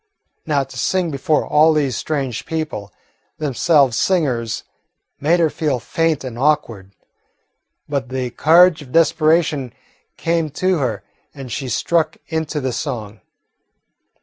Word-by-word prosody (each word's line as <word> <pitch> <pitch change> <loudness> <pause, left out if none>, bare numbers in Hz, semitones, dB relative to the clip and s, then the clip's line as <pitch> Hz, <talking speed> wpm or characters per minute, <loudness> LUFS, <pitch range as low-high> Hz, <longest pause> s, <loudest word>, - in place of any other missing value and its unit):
Now 145 -3 +2
to 135 - -9
sing 185 -3 0
before 150 +2 0
all 155 +2 +4
these 140 -5 0
strange 135 -4 -3
people, 155 - -4 0.5
themselves 140 -3 +2
singers, 125 - 0 0.6
made 165 +5 +2
her 160 -3 +2
feel 145 -5 -1
faint 165 +4 -1
and 120 -2 -7
awkward. 115 -10 0 0.9
But 140 -3 -3
the 130 -1 -3
courage 170 +4 +5
of 130 -3 -12
desperation 155 -4 +2 0.4
came 165 -1 0
to 185 -2 +1
her, 125 -5 -2 0.3
and 135 -4 -8
she 130 +2 -4
struck 160 +6 0
into 160 -2 -2
the 130 -3 -2
song. 115 -5 -5
150 Hz, 125 wpm, -19 LUFS, 130-160 Hz, 0.9 s, courage